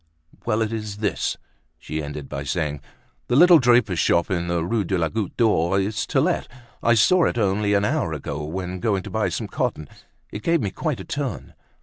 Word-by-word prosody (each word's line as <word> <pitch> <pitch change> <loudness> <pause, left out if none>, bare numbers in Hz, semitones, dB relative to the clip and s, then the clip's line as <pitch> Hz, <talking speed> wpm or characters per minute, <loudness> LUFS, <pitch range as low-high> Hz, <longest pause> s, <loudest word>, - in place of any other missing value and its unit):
"Well, 110 -1 +1
it 110 +1 -3
is 105 -2 -5
this," 105 -1 -1 0.4
she 75 +1 -5
ended 75 -1 -6
by 70 -1 -5
saying, 75 -1 -2 0.5
"the 120 - +1
little 175 +3 +8
draper's 120 - +3
shop 85 +4 +2
in 85 -2 -1
the 85 -1 -1
Rue 110 +3 0
de 95 +1 -1
la 80 -2 0
Goutte 110 -1 -4
d'Or, 95 -5 +2
is 105 +2 -2
to - - +1
let. - - 0 0.3
I 120 0 +4
saw 175 +11 +4
it - - -1
only 105 -1 +1
an 100 0 +2
hour - - 0
ago, 75 +1 -4
when 90 +3 -4
going 100 -1 0
to - - -8
buy - - 0
some - - -3
cotton. 75 - -2 0.4
It 105 - -6
gave 165 +5 +2
me 100 -7 -2
quite - - -3
a - - -8
turn." 140 -7 -4
100 Hz, 210 wpm, -23 LUFS, 85-115 Hz, 0.5 s, little